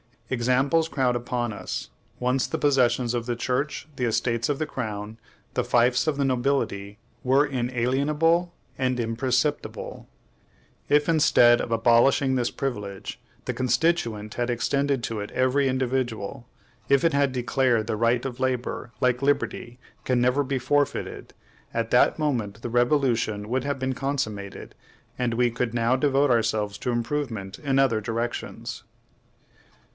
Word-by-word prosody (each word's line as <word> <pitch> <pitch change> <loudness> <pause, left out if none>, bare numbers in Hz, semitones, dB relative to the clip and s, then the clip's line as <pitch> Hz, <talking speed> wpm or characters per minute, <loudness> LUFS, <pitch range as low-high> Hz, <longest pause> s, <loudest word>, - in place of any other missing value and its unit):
Examples 130 +6 +2
crowd 130 -6 0
upon 120 -1 -2
us: - - -5 0.3
once 125 +1 0
the - - -2
possessions 125 -4 +2
of 120 -1 -2
the 120 0 -1
church, 130 +6 -2
the 125 - 0
estates 115 0 0
of 145 - 0
the 155 - 0
crown, 110 -5 -5 0.4
the - - +1
fiefs 120 +3 +2
of 155 - +2
the 140 - +1
nobility 120 -6 -1 0.2
were 135 +3 +3
inalienable 140 +7 +1 0.3
and 130 -1 +1
imprescriptible. 125 +5 -2 0.8
If, 145 0 +3
instead 120 -7 +5
of - - -5
abolishing 120 +4 +4
this 125 -2 +1
privilege, 105 -8 -5 0.3
the - - -2
Constituent 125 -5 0
had 120 0 -1
extended 140 +3 0
it - - -21
to 110 -3 -3
every 130 +6 +1
individual; 130 -2 -2 0.4
if 140 -1 +4
it 165 -2 +3
had 140 -1 +2
declared 125 -1 +1
that 110 - -8
the 110 -2 -1
right 115 +3 +2
of 130 -2 -5
labor, 125 -2 -2
like 125 0 +2
liberty, 125 -3 -1 0.3
can 125 -1 +2
never 125 +4 +2
be 135 0 -2
forfeited, 145 +3 -1 0.4
at - - -2
that - - +4
moment 115 -9 -2
the 120 - -3
revolution 120 -4 +1
would 130 +2 -1
have 140 -1 -1
been 130 0 -1
consummated, 120 -8 -4 0.5
and 120 -2 0
we 120 +1 +2
could 120 0 -2
now 120 +2 +2
devote 140 0 +2
ourselves 110 -3 +1
to - - -3
improvement 120 -5 -3
in 135 -3 0
other 130 -5 +3
directions. 115 +2 -4
125 Hz, 145 wpm, -25 LUFS, 115-135 Hz, 0.8 s, instead